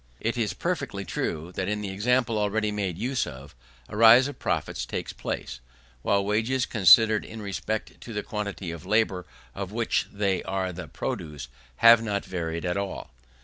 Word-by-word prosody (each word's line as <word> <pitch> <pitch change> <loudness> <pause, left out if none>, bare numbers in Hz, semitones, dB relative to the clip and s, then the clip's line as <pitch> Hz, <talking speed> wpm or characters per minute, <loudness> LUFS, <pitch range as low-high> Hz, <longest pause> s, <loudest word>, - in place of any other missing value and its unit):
It 115 - -1
is 115 -4 -1
perfectly - - -3
true, 80 +3 -3
that, 95 +1 -2
in 105 0 -1
the 100 -2 -4
example 115 +2 +1
already 105 +1 0
made 100 -5 -2
use 130 +1 -1
of, 70 0 -10 0.3
a - - -8
rise 115 +4 +8
of 145 - -8
profits - - -2
takes - - -4
place, - - -5 0.4
while 100 +6 +1
wages, 115 +5 +1
considered 110 +1 +6
in 110 - -9
respect 105 +1 -4
to 120 - -9
the 105 -2 -3
quantity 100 -4 -4
of 85 -2 -8
labour 105 -4 +1 0.3
of 95 -1 -5
which 115 +1 0
they 100 -2 0
are 95 -1 -2
the - - -7
produce, 75 -6 -5 0.4
have 115 -1 +9
not 105 -3 -2
varied 85 -2 -3
at 90 +2 -1
all. 100 -8 -4
105 Hz, 175 wpm, -26 LUFS, 95-110 Hz, 0.4 s, have